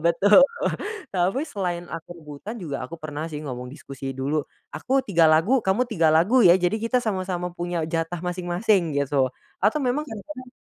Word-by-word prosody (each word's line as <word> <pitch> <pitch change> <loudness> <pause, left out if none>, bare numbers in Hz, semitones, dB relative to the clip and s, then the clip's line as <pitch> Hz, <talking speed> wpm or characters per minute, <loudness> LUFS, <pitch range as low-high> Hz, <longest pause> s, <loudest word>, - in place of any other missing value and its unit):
Betul, 205 +9 +6 0.7
tapi 190 +9 0
selain 180 - -3
aku 165 +2 -7
rebutan 155 +7 -9
juga, 140 - -5
aku 150 - -9
pernah 155 0 -5
sih 150 -2 -6
ngomong 125 -3 -6
diskusi 135 0 -7
dulu, 140 +3 -1 0.2
"Aku 265 +2 0
3 170 -9 +3
lagu, 165 +12 +4
kamu 205 +2 +1
3 165 -7 +2
lagu, 175 +11 +4
ya." 175 - +8
Jadi 185 +4 +1
kita 235 +3 0
sama 190 -5 -2
sama 180 -1 -3
punya 175 -1 -3
jatah 165 +1 -3
masing-masing, 180 -1 0
gitu. 140 -1 +1 0.3
Atau 220 +10 +2
memang 275 +5 0
kadang-kadang 255 +3 -9
175 Hz, 170 wpm, -24 LUFS, 155-210 Hz, 0.7 s, ya